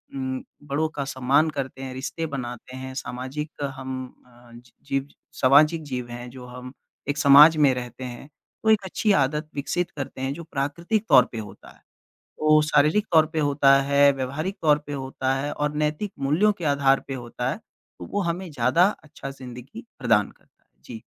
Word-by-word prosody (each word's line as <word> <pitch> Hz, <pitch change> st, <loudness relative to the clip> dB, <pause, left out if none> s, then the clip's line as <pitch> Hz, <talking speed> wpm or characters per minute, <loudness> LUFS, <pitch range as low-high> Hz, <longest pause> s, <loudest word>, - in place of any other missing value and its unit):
उम, 130 Hz, -1 st, -3 dB, 0.2 s
बड़ों 145 Hz, +2 st, -1 dB
का 140 Hz, -3 st, -4 dB
सम्मान 140 Hz, +4 st, +2 dB
करते 135 Hz, -2 st, -5 dB
हैं, 130 Hz, -1 st, -6 dB
रिश्ते 140 Hz, +5 st, -4 dB
बनाते 125 Hz, 0 st, -7 dB
हैं, 130 Hz, 0 st, -7 dB
सामाजिक 130 Hz, +5 st, -5 dB, 0.3 s
हम 130 Hz, 0 st, -5 dB, 0.3 s
अ, 120 Hz, -1 st, -20 dB, 0.3 s
जीव 135 Hz, 0 st, -2 dB, 0.3 s
सामाजिक 150 Hz, +5 st, +5 dB
जीव 125 Hz, -4 st, -5 dB
हैं 120 Hz, +1 st, -7 dB
जो 125 Hz, 0 st, -11 dB
हम 125 Hz, +1 st, -10 dB, 0.4 s
एक 145 Hz, -, -1 dB
समाज 150 Hz, +3 st, +8 dB
में 130 Hz, -, +3 dB
रहते 125 Hz, 0 st, -7 dB
हैं। 125 Hz, +3 st, -8 dB, 0.3 s
तो 220 Hz, -, +2 dB
एक 215 Hz, -2 st, +5 dB
अच्छी 210 Hz, +3 st, 0 dB
आदत 150 Hz, +3 st, 0 dB
विकसित 170 Hz, +5 st, -2 dB
करते 135 Hz, -1 st, -6 dB
हैं 135 Hz, +1 st, -1 dB
जो 170 Hz, +2 st, -8 dB
प्राकृतिक 165 Hz, +8 st, -2 dB
तौर 125 Hz, -4 st, +7 dB
पे 115 Hz, -, -7 dB
होता 105 Hz, -2 st, -10 dB
है, -, -, -20 dB, 0.6 s
ओ, 155 Hz, 0 st, +5 dB
शारीरिक 180 Hz, +11 st, +3 dB
तौर 160 Hz, -1 st, +6 dB
पे 160 Hz, -, -2 dB
होता 140 Hz, -1 st, +4 dB
है, 140 Hz, 0 st, +6 dB
व्यावहारिक 140 Hz, +9 st, -4 dB
तौर 150 Hz, -2 st, +4 dB
पे 145 Hz, -, -6 dB
होता 135 Hz, -1 st, -2 dB
है 140 Hz, +2 st, -3 dB
और 150 Hz, 0 st, -2 dB
नैतिक 155 Hz, +7 st, -2 dB
मूल्यों 160 Hz, +10 st, +3 dB
के -, -, -4 dB
आधार 135 Hz, -1 st, +3 dB
पे 135 Hz, -, -3 dB
होता 125 Hz, 0 st, -4 dB
है, 150 Hz, -, -3 dB, 0.4 s
तो -, -, -8 dB
वो 205 Hz, -, 0 dB
हमें 175 Hz, +1 st, -3 dB
ज़्यादा 140 Hz, +7 st, +3 dB, 0.2 s
अच्छा 145 Hz, -2 st, -8 dB
ज़िंदगी 130 Hz, -, -10 dB
प्रदान 110 Hz, -5 st, +2 dB
करता -, -, -29 dB
है, -, -, -48 dB, 0.2 s
जी, 115 Hz, -2 st, -9 dB
140 Hz, 185 wpm, -24 LUFS, 130-155 Hz, 0.6 s, समाज